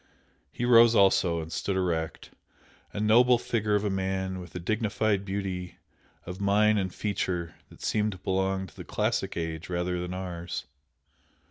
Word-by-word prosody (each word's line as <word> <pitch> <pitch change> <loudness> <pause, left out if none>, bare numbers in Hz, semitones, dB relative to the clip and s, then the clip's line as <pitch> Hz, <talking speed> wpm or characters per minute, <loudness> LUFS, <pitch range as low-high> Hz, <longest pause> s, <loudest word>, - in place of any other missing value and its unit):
He 120 - -3
rose 115 -1 +7
also 90 -4 +4
and 80 +1 -8
stood 100 - -2
erect, 85 -4 -2 0.6
a - - -5
noble 120 +4 +5
figure 110 -3 0
of 105 - +1
a 105 - 0
man 95 0 -2
with 90 -2 -11
a - - -3
dignified 110 +1 0
beauty 95 -2 -4 0.5
of 90 +3 -7
mien 105 +2 +3
and 95 -1 -2
feature 90 -4 -2 0.2
that - - -14
seemed 105 -1 0
to - - -10
belong 95 +1 -1
to 85 - -16
the - - -8
classic - - -1
age 80 0 -4
rather 90 0 -1
than 90 +1 -4
ours. 85 -4 -5
95 Hz, 160 wpm, -28 LUFS, 90-105 Hz, 0.6 s, rose